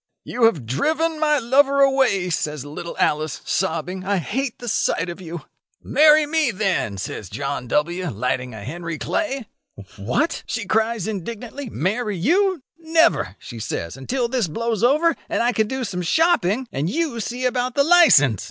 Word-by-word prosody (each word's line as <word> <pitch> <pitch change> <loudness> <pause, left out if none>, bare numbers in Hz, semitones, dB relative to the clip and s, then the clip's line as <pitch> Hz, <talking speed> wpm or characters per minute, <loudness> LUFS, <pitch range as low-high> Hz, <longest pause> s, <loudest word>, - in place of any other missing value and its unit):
'You 240 -1 +1
have 165 - +2
driven 315 - 0
my 300 -1 +3
lover 275 +3 +3
away,' 265 -10 +3
says 150 -3 -2
little 155 +4 -7
Alice, 155 -1 0
sobbing: 185 0 -2
'I 200 +1 0
hate 245 - -3
the 240 - -9
sight 175 -5 0
of 175 +2 -7
you.' 170 -2 -7 0.4
'Marry 305 0 +5
me, 305 -2 +1
then,' 190 - -1
says 95 0 -6
John 140 0 -4
W., 170 +7 0
lighting 125 +2 -2
a 105 - -8
Henry 165 +6 -5
Clay. 275 - -2 0.5
'What!' 125 - -1
she 230 -3 -3
cries 220 0 0
indignantly, 230 +6 -6
'marry 210 - -2
you! 350 - +2 0.2
Never,' 320 - +2
she 115 - -10
says, 85 -4 -4
'until 240 - -2
this 240 -5 0
blows 230 +5 -2
over, 305 +6 +3
and - - 0
I 240 - +3
can 220 -2 0
do 265 +2 -3
some 185 -5 -3
shopping, 240 - +2
and 145 +5 -2
you 300 - -1
see 245 +4 -3
about 250 0 -1
the 280 - +4
licence. 285 - +6
220 Hz, 165 wpm, -22 LUFS, 165-275 Hz, 0.5 s, licence